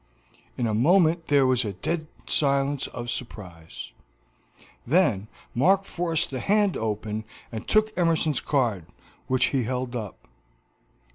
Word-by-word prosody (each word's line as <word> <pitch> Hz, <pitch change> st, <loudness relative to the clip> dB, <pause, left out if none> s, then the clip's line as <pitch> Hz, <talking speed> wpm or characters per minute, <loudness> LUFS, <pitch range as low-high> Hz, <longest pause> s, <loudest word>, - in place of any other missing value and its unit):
In 120 Hz, -, 0 dB
a 110 Hz, -, 0 dB
moment 165 Hz, -, +3 dB
there 140 Hz, -2 st, +4 dB
was 130 Hz, -1 st, +3 dB
a 105 Hz, -3 st, -3 dB
dead 155 Hz, -, -3 dB, 0.2 s
silence 140 Hz, -1 st, +1 dB
of 120 Hz, -1 st, -5 dB
surprise; 85 Hz, -, -8 dB, 0.9 s
then 130 Hz, -, +2 dB, 0.3 s
Mark 190 Hz, +10 st, +3 dB
forced 165 Hz, -5 st, -1 dB
the 130 Hz, -, -3 dB
hand 205 Hz, -, +2 dB
open 110 Hz, 0 st, -3 dB, 0.3 s
and 110 Hz, -2 st, -6 dB
took 215 Hz, 0 st, +2 dB
Emerson's 165 Hz, -4 st, +2 dB
card, 115 Hz, -, 0 dB, 0.4 s
which 130 Hz, -1 st, +2 dB
he 135 Hz, -, +1 dB
held 125 Hz, +1 st, -3 dB
up. 110 Hz, -5 st, -7 dB
130 Hz, 130 wpm, -25 LUFS, 110-165 Hz, 0.9 s, there